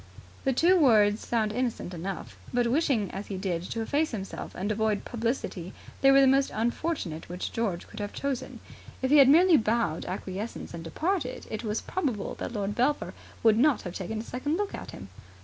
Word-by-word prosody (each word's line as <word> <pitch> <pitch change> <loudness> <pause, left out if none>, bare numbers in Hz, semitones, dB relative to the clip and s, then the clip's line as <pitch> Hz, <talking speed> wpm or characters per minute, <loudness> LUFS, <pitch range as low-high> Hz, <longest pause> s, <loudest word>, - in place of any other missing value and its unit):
The 270 - +3
two 350 +8 +4
words 215 -7 +4
sound 220 -3 +1
innocent 240 -6 -2
enough, 180 +3 -5 0.2
but, 245 -1 +2
wishing 245 - +1
as 195 +3 -6
he 195 - -4
did 185 -3 -2
to 230 - -2
efface 300 +6 +1
himself 195 -4 -6
and 200 +3 -2
avoid 215 -1 0
publicity, 230 -6 -3 0.3
they 270 - +6
were 275 0 +7
the - - +6
most 270 +1 +4
unfortunate 230 - -2
which 180 +1 -4
George 205 -7 -2
could 215 - -11
have 205 0 -3
chosen. 265 -2 -4 0.4
If 260 - +1
he 300 - +7
had 275 -2 +8
merely 340 +3 +7
bowed 220 -7 0
acquiescence 190 +4 -5
and 165 -1 -6
departed, 305 - -2
it 215 - -4
is 215 0 -1
probable 255 - -2
that - - -4
Lord 205 -2 -2
Belpher 260 +6 0 0.3
would 220 -1 +5
not 290 +1 +3
have 180 - -6
taken 200 +4 -4
a - - -4
second 290 +7 -2
look 410 0 -2
at - - -7
him. - - -9
230 Hz, 195 wpm, -28 LUFS, 200-270 Hz, 0.4 s, had